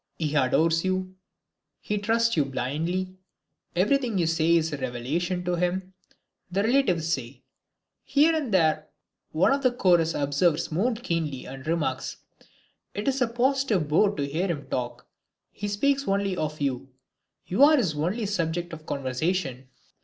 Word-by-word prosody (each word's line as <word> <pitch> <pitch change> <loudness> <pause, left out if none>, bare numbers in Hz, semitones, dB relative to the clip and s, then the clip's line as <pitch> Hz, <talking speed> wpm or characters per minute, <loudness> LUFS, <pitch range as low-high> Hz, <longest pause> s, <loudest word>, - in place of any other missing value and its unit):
"He 155 -3 -2
adores 160 +4 +2
you, 185 0 -1 0.7
he 210 0 -2
trusts 230 +2 +2
you 155 - +3
blindly, 165 +8 -3 0.6
everything 230 +4 +2
you 175 - +2
say 165 +1 +3
is 160 -2 +1
a - - -2
revelation 140 +9 -2
to 175 0 0
him," 185 +2 -1 0.6
the 195 +3 +1
relatives 185 - +2
say. 125 -1 -5 0.6
Here 310 +3 +3
and 290 -7 -2
there 155 -4 +2 0.4
one 160 +11 +3
of 280 - 0
the 255 -2 +3
chorus 175 -8 +3
observes 145 +4 +1
more 220 +10 +1
keenly 165 - -3
and 135 +2 -9
remarks, 150 -6 -1 0.8
"It 205 +5 -4
is 270 -1 +1
a 250 - +4
positive 240 - +1
bore 200 +7 +3
to 145 - -1
hear 165 +7 -1
him 155 -6 -3
talk, 120 -1 -3 0.5
he 205 - -5
speaks 275 +7 +1
only 195 -1 +1
of 155 -2 -3
you; 135 -2 -2 0.6
you 190 +9 -1
are 305 +1 +7
his 195 - +1
only 180 +10 -1
subject 175 -3 -2
of 155 -1 -10
conversation." 135 0 -2
175 Hz, 155 wpm, -26 LUFS, 150-205 Hz, 0.8 s, are